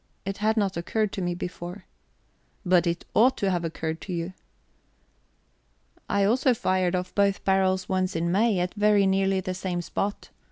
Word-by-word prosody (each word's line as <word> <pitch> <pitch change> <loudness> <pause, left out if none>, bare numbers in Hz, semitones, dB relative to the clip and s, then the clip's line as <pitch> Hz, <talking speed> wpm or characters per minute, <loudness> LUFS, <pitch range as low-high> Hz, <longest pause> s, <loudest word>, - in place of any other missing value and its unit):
"It 195 +1 -3
had 220 +2 +1
not 195 -4 0
occurred 210 +4 -1
to 195 - -4
me 175 -1 -1
before." 180 +1 -7 0.8
"But 180 -1 +4
it 170 0 -2
ought 255 +4 +4
to 195 -1 0
have 175 -2 -1
occurred 160 0 -4
to 185 - -6
you." 170 +2 -3 1.8
"I 200 0 +2
also 245 +5 +3
fired 185 -3 +1
off 180 0 -3
both 200 -1 +1
barrels 190 -1 +2
once 185 -1 -1
in 170 +1 0
May, 210 +2 +3
at 180 0 -1
very 210 -1 +3
nearly 195 0 +2
the 185 0 -3
same 185 -1 -3
spot. 200 +4 -3
190 Hz, 170 wpm, -26 LUFS, 180-200 Hz, 1.8 s, But